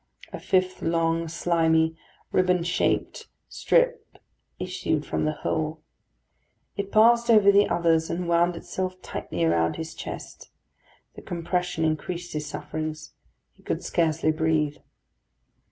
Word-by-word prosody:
A -, -, -5 dB
fifth 185 Hz, 0 st, 0 dB
long, 165 Hz, 0 st, 0 dB
slimy, 160 Hz, -1 st, +2 dB, 0.4 s
riband 180 Hz, -2 st, +2 dB
shaped 175 Hz, 0 st, -1 dB, 0.2 s
strip -, -, 0 dB, 0.4 s
issued 180 Hz, -4 st, -2 dB
from -, -, -1 dB
the 155 Hz, -, +1 dB
hole. 155 Hz, 0 st, -2 dB, 0.9 s
It 200 Hz, -1 st, -4 dB
passed 235 Hz, +2 st, +5 dB
over 210 Hz, -3 st, +7 dB
the 200 Hz, +1 st, +4 dB
others, 165 Hz, -1 st, +2 dB
and 175 Hz, +1 st, -3 dB
wound 170 Hz, +1 st, +2 dB
itself 185 Hz, +2 st, -4 dB
tightly 85 Hz, -, -4 dB
around 80 Hz, 0 st, +2 dB
his 160 Hz, 0 st, -6 dB
chest. -, -, -8 dB, 0.6 s
The -, -, -11 dB
compression 175 Hz, -1 st, -2 dB
increased 170 Hz, +3 st, -3 dB
his 150 Hz, -1 st, -3 dB
sufferings. 155 Hz, +1 st, -5 dB, 0.4 s
He -, -, -25 dB
could -, -, -3 dB
scarcely 160 Hz, -2 st, +1 dB
breathe. 155 Hz, -2 st, 0 dB
165 Hz, 120 wpm, -25 LUFS, 160-185 Hz, 0.9 s, over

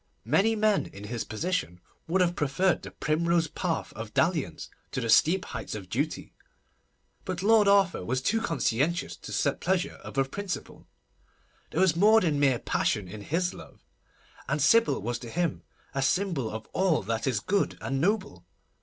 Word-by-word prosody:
Many 195 Hz, -, +3 dB
men 215 Hz, -1 st, +2 dB
in 100 Hz, -, -11 dB
his 115 Hz, +2 st, -4 dB
position 165 Hz, -, -3 dB, 0.3 s
would 185 Hz, +3 st, +2 dB
have 175 Hz, -1 st, +2 dB
preferred 150 Hz, +6 st, +1 dB
the -, -, -8 dB
primrose 170 Hz, +2 st, +1 dB
path 165 Hz, +1 st, -3 dB
of 110 Hz, -1 st, -8 dB
dalliance 155 Hz, -, 0 dB, 0.2 s
to -, -, -3 dB
the 115 Hz, -3 st, 0 dB
steep 180 Hz, -, +4 dB
heights -, -, -6 dB
of -, -, -8 dB
duty; -, -, -2 dB, 0.9 s
but 185 Hz, -1 st, -4 dB
Lord 215 Hz, -1 st, +5 dB
Arthur 200 Hz, -, +3 dB
was 130 Hz, +8 st, -1 dB
too 225 Hz, -, 0 dB
conscientious 165 Hz, -, 0 dB
to -, -, -10 dB
set 140 Hz, -1 st, 0 dB
pleasure 185 Hz, 0 st, -1 dB
above 135 Hz, 0 st, -2 dB
principle. 200 Hz, 0 st, -6 dB, 0.8 s
There 165 Hz, -, -1 dB
was 185 Hz, -4 st, +4 dB
more 215 Hz, +5 st, +6 dB
than 155 Hz, -7 st, 0 dB
mere 135 Hz, -3 st, +3 dB
passion 105 Hz, -3 st, -1 dB
in 105 Hz, +3 st, -8 dB
his 175 Hz, -, -1 dB
love; -, -, -14 dB, 0.6 s
and -, -, 0 dB
Sybil 230 Hz, -, +4 dB
was 120 Hz, +2 st, -2 dB
to 120 Hz, -, -8 dB
him 170 Hz, +2 st, -1 dB, 0.3 s
a 135 Hz, -, -1 dB
symbol 155 Hz, -, 0 dB
of 110 Hz, 0 st, -6 dB
all 185 Hz, -, +2 dB
that 115 Hz, +5 st, -2 dB
is 125 Hz, -6 st, +1 dB
good 200 Hz, -, 0 dB
and 135 Hz, 0 st, -2 dB
noble. 205 Hz, +3 st, -1 dB
165 Hz, 170 wpm, -28 LUFS, 130-190 Hz, 0.9 s, more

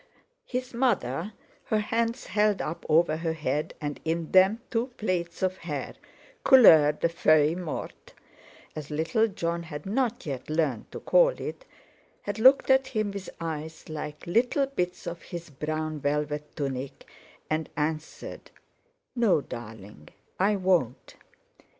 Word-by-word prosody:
His 255 Hz, 0 st, -4 dB
mother, 205 Hz, -, 0 dB, 0.3 s
her 215 Hz, -, +1 dB
hands 230 Hz, +3 st, -1 dB
held 210 Hz, 0 st, +2 dB
up 155 Hz, -, -5 dB
over 155 Hz, 0 st, +4 dB
her 165 Hz, 0 st, -2 dB
head, 150 Hz, -1 st, -2 dB
and 145 Hz, -1 st, -4 dB
in 165 Hz, 0 st, -2 dB
them 190 Hz, +4 st, +5 dB
two 230 Hz, +1 st, 0 dB
plaits 175 Hz, -4 st, -2 dB
of 185 Hz, 0 st, 0 dB
hair—"couleur 165 Hz, -, +4 dB
de 160 Hz, -, 0 dB
feuille 155 Hz, -1 st, +3 dB
morte," 175 Hz, -4 st, -6 dB, 0.6 s
as 150 Hz, -2 st, -6 dB
little 165 Hz, +10 st, +1 dB
Jon 170 Hz, -4 st, -2 dB
had 150 Hz, -3 st, -8 dB
not 240 Hz, +3 st, -1 dB
yet 135 Hz, -3 st, -5 dB
learned 155 Hz, -7 st, -1 dB
to -, -, -6 dB
call -, -, +5 dB
it—had 225 Hz, -, -9 dB
looked 265 Hz, +3 st, +6 dB
at 265 Hz, 0 st, +4 dB
him 215 Hz, -5 st, -1 dB
with 200 Hz, -1 st, -6 dB
eyes 160 Hz, -1 st, -6 dB
like 150 Hz, -1 st, -6 dB
little 240 Hz, +9 st, +2 dB
bits 180 Hz, -10 st, -3 dB
of 170 Hz, -1 st, -5 dB
his 170 Hz, -3 st, -8 dB
brown 155 Hz, +2 st, -3 dB
velvet 150 Hz, +1 st, -2 dB
tunic, 135 Hz, -2 st, -4 dB, 0.4 s
and 155 Hz, 0 st, -2 dB
answered: 155 Hz, +1 st, -4 dB, 0.7 s
"No, 230 Hz, -9 st, +3 dB
darling, 105 Hz, -, -10 dB, 0.3 s
I 200 Hz, +3 st, +3 dB
won't." 180 Hz, -, 0 dB
170 Hz, 130 wpm, -27 LUFS, 150-215 Hz, 0.7 s, looked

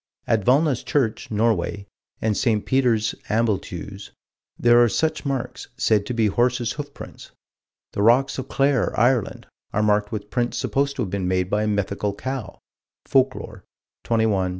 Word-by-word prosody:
At 110 Hz, -3 st, +1 dB
Valna's 135 Hz, +2 st, +3 dB
church, 120 Hz, -6 st, -1 dB
Norway, 105 Hz, -2 st, 0 dB, 0.4 s
and 110 Hz, -1 st, +1 dB
St. 110 Hz, -3 st, +1 dB
Peter's, 120 Hz, -5 st, +2 dB, 0.2 s
Ambleteuse, 100 Hz, -3 st, -2 dB, 0.5 s
there 120 Hz, 0 st, +5 dB
are 120 Hz, -, +3 dB
such 155 Hz, +3 st, -1 dB
marks, 135 Hz, -3 st, -4 dB
said 105 Hz, -4 st, +2 dB
to -, -, -2 dB
be 115 Hz, -1 st, +2 dB
horses' 120 Hz, +2 st, +1 dB
hoofprints. 145 Hz, -1 st, -9 dB, 0.6 s
The -, -, -2 dB
rocks 125 Hz, +6 st, +3 dB
of 130 Hz, -, -5 dB
Clare, 135 Hz, -5 st, +1 dB
Ireland, 120 Hz, -1 st, +1 dB, 0.3 s
are 105 Hz, -, +1 dB
marked 105 Hz, 0 st, +2 dB
with 105 Hz, -1 st, -6 dB
prints 120 Hz, -1 st, -1 dB
supposed 140 Hz, 0 st, 0 dB
to 125 Hz, -, -1 dB
have 95 Hz, -, -5 dB
been 95 Hz, -2 st, -2 dB
made 90 Hz, 0 st, 0 dB
by 105 Hz, -, +2 dB
a 110 Hz, -, 0 dB
mythical 100 Hz, 0 st, -1 dB
cow 130 Hz, -4 st, -5 dB, 0.5 s
(Folklore, 130 Hz, -6 st, 0 dB, 0.4 s
21 110 Hz, -1 st, +2 dB
184). 95 Hz, -2 st, 0 dB
115 Hz, 155 wpm, -23 LUFS, 105-125 Hz, 0.6 s, there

